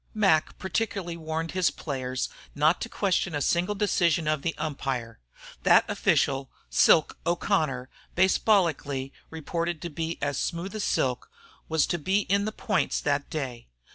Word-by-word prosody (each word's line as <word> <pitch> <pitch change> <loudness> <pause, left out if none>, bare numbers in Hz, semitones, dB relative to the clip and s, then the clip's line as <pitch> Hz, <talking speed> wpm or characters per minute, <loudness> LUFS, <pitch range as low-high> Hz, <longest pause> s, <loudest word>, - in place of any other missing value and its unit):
Mac 195 -8 +3
particularly 190 -2 -2
warned 160 0 -3
his 185 -1 +2
players 130 -3 -3 0.3
not 155 +4 +3
to 230 - -3
question 190 -6 0
a - - 0
single 175 +8 +1
decision 175 -5 +2
of 155 -2 +1
the 165 +3 -2
umpire. 135 -6 -3 0.4
That - - +5
official, 135 0 +1 0.2
"Silk" 160 - +4
O'Connor, 155 -7 0 0.3
base 190 +2 +4
ballically 150 -10 +1 0.2
reported 165 +1 -3
to 170 - -4
be 165 +2 -3
as 140 -1 -1
smooth 175 +4 -3
as 215 -2 -3
silk, 125 -2 0 0.4
was 160 -1 +3
to 175 - -2
be 190 +6 +2
in 200 0 +1
the 215 - -2
points - - 0
that 140 -1 -1
day. 130 -6 -5
165 Hz, 150 wpm, -27 LUFS, 145-185 Hz, 0.4 s, That